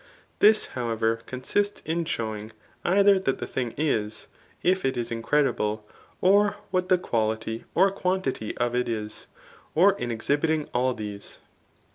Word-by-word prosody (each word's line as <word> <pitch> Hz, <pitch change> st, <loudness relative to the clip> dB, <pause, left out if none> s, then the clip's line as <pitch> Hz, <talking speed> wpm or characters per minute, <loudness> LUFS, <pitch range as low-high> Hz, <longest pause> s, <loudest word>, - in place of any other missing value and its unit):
This, 215 Hz, +1 st, +6 dB
however, 115 Hz, -2 st, 0 dB
conasts 200 Hz, +11 st, -1 dB
in 165 Hz, +1 st, -1 dB
showing, 110 Hz, -6 st, -4 dB, 0.3 s
either 195 Hz, +2 st, +5 dB
that 135 Hz, -8 st, 0 dB
the -, -, -4 dB
thing 125 Hz, -3 st, -3 dB
is, 110 Hz, -8 st, -1 dB, 0.3 s
if 185 Hz, +1 st, +2 dB
it 135 Hz, -1 st, 0 dB
is 120 Hz, -1 st, -3 dB
incredible, 115 Hz, -4 st, 0 dB, 0.3 s
or 205 Hz, +2 st, +4 dB, 0.2 s
what 185 Hz, 0 st, 0 dB
the 185 Hz, -, +5 dB
quality, 110 Hz, -5 st, -2 dB
or 190 Hz, +2 st, +5 dB
quantity 180 Hz, -, -2 dB
of 120 Hz, -1 st, 0 dB
it 125 Hz, -1 st, 0 dB
is,* 105 Hz, -2 st, -4 dB, 0.5 s
or 190 Hz, +5 st, +6 dB
in 120 Hz, -, -3 dB
exhibiting 145 Hz, +6 st, 0 dB
all 125 Hz, +1 st, +1 dB
these. 105 Hz, -2 st, -7 dB
130 Hz, 140 wpm, -26 LUFS, 115-180 Hz, 0.5 s, This